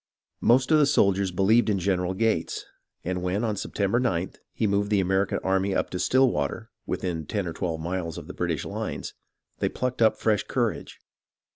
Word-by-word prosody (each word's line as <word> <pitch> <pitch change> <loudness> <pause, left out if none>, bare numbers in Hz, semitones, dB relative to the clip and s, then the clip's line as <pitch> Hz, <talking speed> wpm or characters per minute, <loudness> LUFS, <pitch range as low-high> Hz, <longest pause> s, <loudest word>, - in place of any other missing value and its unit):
Most 125 +5 +3
of 155 - +6
the 145 - +5
soldiers 100 -8 +3
believed 105 +6 +3
in 100 - +2
General 90 -1 0
Gates, 110 -5 0 0.4
and 90 +1 -2
when, 90 +5 -1
on 110 -3 0
September 100 +3 0
9th, 95 -8 -1
he - - -1
moved 100 0 +1
the 105 -2 +3
American 95 +1 +1
army 95 0 +1
up - - -1
to 90 - -3
Stillwater, 125 -2 +1 0.2
within 80 -5 -3
ten 100 -3 -2
or 85 - -4
twelve 80 -3 -3
miles 85 -1 -3
of - - -7
the - - -8
British - - -2
lines, - - -5 0.5
they - - +1
plucked 125 -1 -3
up 110 -1 +4
fresh 105 -3 +2
courage. - - -2
100 Hz, 180 wpm, -26 LUFS, 90-110 Hz, 0.5 s, of